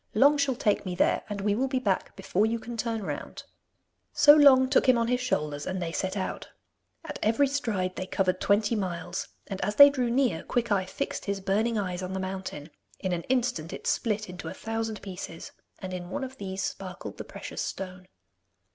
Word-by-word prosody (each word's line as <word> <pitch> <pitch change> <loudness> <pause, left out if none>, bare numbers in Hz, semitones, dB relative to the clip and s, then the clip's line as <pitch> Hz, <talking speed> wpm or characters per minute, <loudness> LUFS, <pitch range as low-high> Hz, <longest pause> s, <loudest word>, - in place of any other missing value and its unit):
Long 280 +7 +6
shall 275 -2 +2
take 210 -3 +1
me 180 -2 -4
there, - - +2
and 205 -1 -4
we 205 0 +2
will 255 +6 +1
be 265 0 -1
back 200 -7 -1
before 205 +4 +1
you 230 +1 0
can 235 +1 -7
turn 225 -2 -2
round.' - - -5 0.7
So 290 0 +8
Long 275 -3 +7
took 265 0 +3
him 250 - +6
on 230 0 +1
his 250 0 +1
shoulders 150 - -1
and 185 0 -2
they 170 -2 -3
set 190 +3 -2
out. 190 - -4 0.6
At 300 - -6
every 230 +7 +3
stride 220 -10 -1
they 185 - -4
covered 185 -1 0
twenty 210 +3 +2
miles, 185 -5 -3 0.2
and 195 -1 -5
as 205 +2 -1
they 285 0 +10
drew 255 -4 0
near 240 -9 +1
Quickeye 210 -6 0
fixed 275 - -4
his 200 -1 -1
burning 215 +4 +1
eyes 185 -3 -2
on 185 0 -4
the 190 - -2
mountain; 185 -5 -5 0.3
in 190 - -3
an 170 - -1
instant 245 -11 0
it - - -8
split 215 -2 0
into 180 0 -8
a - - -6
thousand 225 -1 -4
pieces, 180 -4 -7 0.3
and 185 -1 -6
in 175 -1 -5
one 285 +7 -3
of 265 0 -7
these 190 -1 -4
sparkled 185 -2 -6
the - - -3
precious - - -7
stone. 185 -1 -6
205 Hz, 205 wpm, -28 LUFS, 185-245 Hz, 0.7 s, they